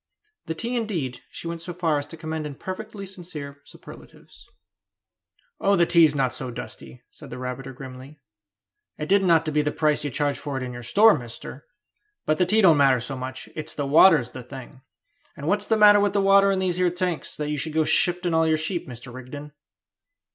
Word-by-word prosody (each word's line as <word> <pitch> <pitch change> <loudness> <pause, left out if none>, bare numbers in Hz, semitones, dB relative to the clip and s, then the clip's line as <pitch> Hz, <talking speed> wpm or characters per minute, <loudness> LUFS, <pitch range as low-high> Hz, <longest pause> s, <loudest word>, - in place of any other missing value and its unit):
The 160 - -3
tea, 235 +8 -3
indeed, 175 - -3
she - - -8
went 170 0 -5
so 175 0 -7
far 165 -4 +1
as 145 - -7
to 165 - -10
commend 160 -1 -4
in 145 - -8
perfectly 200 +4 -7
sincere 155 -7 -9
superlatives. - - -15 1.1
"Oh, 200 0 +3
the 175 -1 +4
tea's 165 -3 +5
not 130 -3 0
so 130 - -5
dusty," 110 - -9
said - - -13
the - - -7
rabbiter 125 +1 -6
grimly; 130 +2 -11 0.8
"it 150 - -5
didn't 195 0 +3
ought 165 -1 +4
to 155 - -1
be 150 - +1
at - - -5
the 150 - 0
price 150 -2 0
you 145 - -2
charge 145 +1 -1
for 140 -2 -4
it 130 - -4
in 125 -1 -6
your 120 - -8
store, 210 - +5
mister! 125 +2 -9 0.6
But 155 +2 0
the 180 - +3
tea 215 +4 +4
don't 170 -6 +6
matter 135 -3 +4
so 130 +4 -5
much; 130 0 -6
it's 155 -1 -7
the 145 - -2
water's 150 -3 +5
the 130 - -8
thing; 130 +1 -11 0.6
and 140 - -7
what's 205 +3 0
the 220 - +2
matter 205 -1 +7
with 205 -1 +1
the 200 - +2
water 195 0 +5
in 195 - 0
these 185 -2 0
here 180 -1 +2
tanks, 180 -2 -3
that 150 0 -3
you 150 - -2
should 155 +2 -3
go 160 0 +2
shifting 175 +2 +2
all 160 0 +3
your 160 0 +2
sheep, 165 +3 -3
Mr. 125 0 -10
Rigden?" 145 +4 -9
155 Hz, 215 wpm, -24 LUFS, 135-180 Hz, 1.1 s, matter